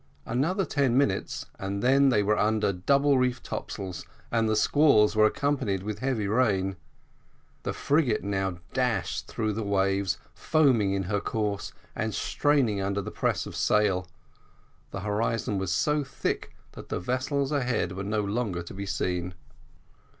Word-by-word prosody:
Another 165 - 0
ten 135 -5 +1
minutes, 110 -9 0
and 100 +2 -3
then 135 +2 +5
they 105 -5 +3
were 105 +1 +2
under 105 -1 +1
double 140 +8 +3
reefed 125 -1 0
topsails, 95 -4 -5 0.3
and 115 -1 +2
the 110 - +2
squalls 110 -3 +4
were 110 0 +6
accompanied 125 -8 -1
with 105 0 -4
heavy 125 -5 -1
rain. 100 -4 +1 0.9
The - - -2
frigate 140 -6 +1
now 95 -2 -1 0.2
dashed 125 -3 -1
through 110 -1 -2
the 110 - -3
waves, 100 -2 +1 0.2
foaming 130 -11 +2
in 95 -1 0
her 100 +2 -1
course 105 -2 -2 0.2
and 110 0 -2
straining 130 -9 +1
under 100 +1 -1
the - - -6
press - - -1
of - - -8
sail. 95 -4 +2 0.8
The 100 - -6
horizon 105 0 -1
was 95 -1 -2
so 150 +10 +1
thick 135 - -3 0.2
that - - -11
the - - -2
vessels 130 - -1
ahead 125 - 0
were 95 +2 -5
no 105 +1 0
longer 100 -4 -2
to 85 - -10
be 100 +1 -5
seen. 90 -5 -2
105 Hz, 155 wpm, -27 LUFS, 100-130 Hz, 0.9 s, were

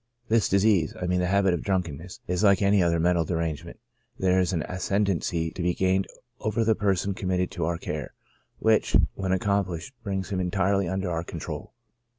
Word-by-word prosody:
This 115 -1 +3
disease 100 -4 +3
(I 90 - -2
mean 90 0 +1
the 90 - +1
habit 95 0 +3
of 85 - -1
drunkenness) 90 -3 -3
is 90 +3 -1
like 100 -1 +5
any 100 0 +4
other 85 -1 +2
mental 85 0 +3
derangement 80 -2 -3 0.2
— - - -42
there 95 0 +2
is 90 0 +1
an 85 -4 -1
ascendancy 90 -3 -1
to 90 - -6
be 90 0 +1
gained 95 +1 +1 0.3
over 110 0 0
the 110 0 +4
person 100 -1 0
committed 90 -1 -1
to 85 -3 -2
our 85 +1 -1
care, 75 -4 -5 0.4
which, 110 -1 +3 0.2
when 95 -1 -3
accomplished, 95 +2 -1
brings 95 -2 -3
him 95 - -1
entirely 95 +1 +1
under 95 0 -2
our 85 0 -2
control." - - -7
95 Hz, 185 wpm, -26 LUFS, 85-100 Hz, 0.4 s, like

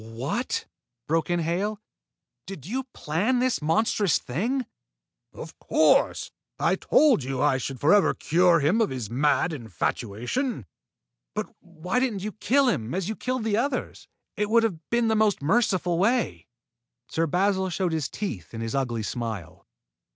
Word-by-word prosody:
"What!" 125 - -3 0.4
broke 165 +2 0
in 175 0 +1
Hale. 195 +6 -1 0.7
"Did 175 -9 -8
you 255 +8 -3
plan 215 - -1
this 255 -5 +1
monstrous 185 +4 +2
thing?" 235 - -2 0.7
"Of - - -10
course! - - +2 0.3
I - - +2
told 280 - +3
you 130 0 -3
I 140 -2 +2
should 135 0 -5
forever 195 - +4
cure 170 0 +3
him 175 +11 +3
of 220 - +2
his 125 -6 -5
mad 150 +6 +2
infatuation." 120 - -3 0.7
"But - - -4
why 175 +6 -3
didn't 230 -7 -1
you 215 - -3
kill 265 +6 +2
him, 125 - -1
as 190 +1 -2
you 220 - -2
killed 255 0 -2
the 215 -2 +1
others? 260 +2 -2 0.3
It 210 0 -1
would 230 +1 +4
have 170 -9 -3
been 235 -1 +2
the 220 - +2
most 215 -2 +2
merciful 180 0 +1
way." 235 +5 +1 0.6
Sir 165 +1 0
Basil 190 +3 +1
showed 180 0 -1
his 155 -4 -1
teeth 115 - -5
in 115 - -5
his 115 -1 -3
ugly 120 -5 -1
smile. 100 -6 -5
180 Hz, 155 wpm, -26 LUFS, 135-220 Hz, 0.7 s, forever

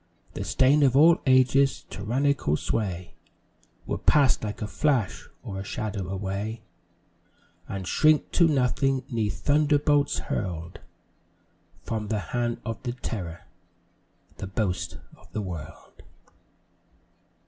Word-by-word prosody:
The - - -4
stain 140 +3 +3
of 135 -2 +4
all 165 +3 +6
ages, 130 +1 +4
tyrannical 130 - 0
sway, 90 -5 -3 0.7
Will - - -3
pass 140 -4 +4
like 105 -1 -4
a - - -2
flash 130 -6 0
or 95 - -5
a - - -4
shadow 100 -2 -4
away, 100 +4 -4 1.1
And 95 -2 -5
shrink 155 - +3
to 170 - +4
nothing 135 -1 +1
'neath 110 -3 -2
thunderbolts 145 -1 +3
hurl'd 85 -3 -4 1.0
From 110 -2 -3
the 110 - 0 0.2
hand 120 -1 -1
of 115 -2 -4
the 120 -2 -3
terror 90 -9 -5 1.0
the 95 - -5
boast 95 -4 -2 0.2
of - - -21
the 110 - -2
world. 85 -5 -9
115 Hz, 115 wpm, -26 LUFS, 95-140 Hz, 1.1 s, all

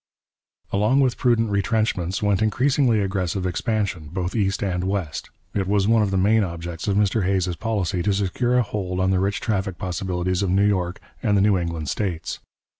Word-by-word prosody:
Along 105 +7 +3
with 130 -3 +3
prudent 115 -3 +2
retrenchments 100 -2 0
went 105 -1 +2
increasingly 125 +2 +2
aggressive 95 -1 -1
expansion, 95 -3 -2
both 90 +1 -3
east 100 -3 0
and 90 -2 -1
west. 95 -6 -3 0.2
It 100 -2 -1
was 100 0 +2
one 115 0 +4
of 105 - +1
the 95 - 0
main 105 +3 +4
objects 85 -1 -5
of 100 -1 +1
Mr 105 +1 +2
Hays's 95 -1 0
policy 100 -3 -1
to 100 - +1
secure 120 +6 +1
a 125 - +4
hold 95 -4 -3
on 95 0 +2
the 95 - +2
rich 100 +2 -1
traffic 95 -4 -1
possibilities 90 -1 -2
of 100 - 0
New 100 +3 +3
York 90 -2 -1 0.2
and 105 -4 +2
the - - +4
New 105 0 +4
England 85 -3 -3
states. 90 0 -3
100 Hz, 190 wpm, -23 LUFS, 90-105 Hz, 0.2 s, one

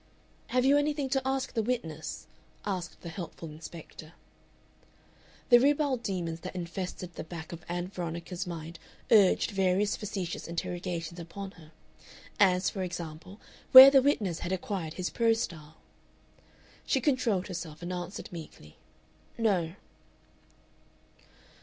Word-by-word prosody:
"Have 250 +1 +1
you 285 +2 +6
anything 290 -2 -1
to 270 0 +1
ask 265 0 -1
the 225 - +1
witness?" 160 -10 -3 0.4
asked 185 -4 -4
the 170 - -7
helpful 165 -1 -7
inspector. 160 0 -11 1.4
The 240 -1 +9
ribald 280 -1 +2
demons 175 -6 -3
that 185 +2 -8
infested 180 0 -5
the - - -6
back 160 -1 -8
of 170 -1 -8
Ann 175 +1 -3
Veronica's 175 +1 -5
mind 165 -1 -7 0.3
urged 205 -4 +5
various 195 +1 +2
facetious 190 -4 -4
interrogations 170 0 -4
upon 190 +4 -7
her, 160 -4 -16 0.7
as, 185 -2 +4
for 195 - -2
example, 175 +2 -6 0.3
where 260 +1 +13
the 270 -1 +6
witness 210 - +1
had 175 - -4
acquired 185 -3 -3
his 180 0 -3
prose 230 -1 +2
style. 155 -4 -8 1.1
She 270 - +1
controlled 240 -9 +1
herself, 170 -4 -7
and 180 +1 -3
answered 180 +2 -6
meekly, 155 - -10 0.6
"No." 190 -7 +1
180 Hz, 130 wpm, -29 LUFS, 170-220 Hz, 1.4 s, where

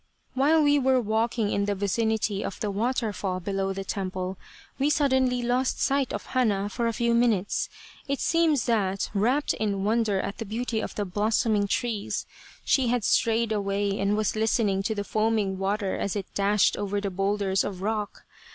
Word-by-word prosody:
" - - -43
While 300 +4 +4
we 290 0 +4
were 260 -1 +3
walking 220 -1 0
in 200 - +1
the 205 0 -1
vicinity 210 +1 0
of - - -5
the 210 - -2
water 225 +1 -1
fall 185 -1 -3
below 195 +1 -2
the 195 0 -4
temple, 185 -1 -3 0.4
we 280 +2 +2
suddenly 260 -4 +2
lost 250 +2 0
sight 275 -2 +1
of - - -4
Hana 205 -6 0
for 235 +2 -1
a - - +1
few 235 +1 +1
minutes. 230 -5 +1 0.4
It 275 0 -1
seems 325 -6 +2
that, 195 -5 0
wrapt 245 +8 +1
in 200 -2 -2
wonder 215 -2 +1
at 200 +1 -4
the 225 - -3
beauty 225 +2 -2
of - - -5
the 205 - -1
blossoming 210 +1 +1
trees, 220 -1 -2 0.4
she 265 -3 +3
had 240 -1 +1
strayed 225 +1 +2
away, 200 -1 -1
and 200 +1 +1
was 215 0 0
listening 215 -3 +1
to 220 +3 -2
the 205 - -2
foaming 215 -3 0
water 195 0 -1
as 200 - -2
it 200 -2 -2
dashed 200 0 +3
over 205 0 -1
the 200 -1 -3
boulders 195 0 0
of 190 -2 -5
rock. 210 -1 -3
215 Hz, 185 wpm, -26 LUFS, 200-235 Hz, 0.4 s, While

